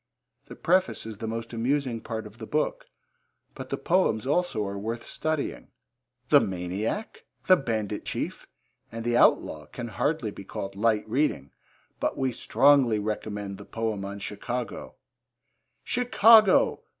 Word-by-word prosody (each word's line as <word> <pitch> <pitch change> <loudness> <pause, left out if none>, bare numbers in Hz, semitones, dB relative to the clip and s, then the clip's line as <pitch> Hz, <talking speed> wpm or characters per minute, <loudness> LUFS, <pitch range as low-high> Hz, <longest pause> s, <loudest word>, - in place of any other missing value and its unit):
The - - -11
preface 185 -4 +1
is 110 -2 -8
the 115 - -4
most 115 +1 -5
amusing 125 0 -1
part 110 -1 -5
of 105 +2 -13
the 110 - -7
book, - - -1 0.7
but - - -8
the - - -2
poems 170 - +1
also 140 -7 0
are 100 0 -4
worth 115 +3 -4
studying. 155 -2 -3 0.6
The - - +8
Maniac, 95 - -3 0.2
The 185 - +7
Bandit 110 - -3
Chief, - - -4 0.4
and 115 0 -6
The 120 0 +1
Outlaw 75 -9 +3
can 120 -2 -7
hardly 125 0 -1
be 100 - -10
called 95 +1 -6
light 110 +1 +1
reading, 115 - 0 0.5
but - - -1
we 130 -1 0
strongly 130 -1 +4
recommend 105 -2 -4
the - - -8
poem 110 -3 -3
on 100 +1 -5
Chicago: 105 +2 -5 0.9
Chicago! 225 -4 +5
115 Hz, 140 wpm, -27 LUFS, 105-145 Hz, 0.9 s, The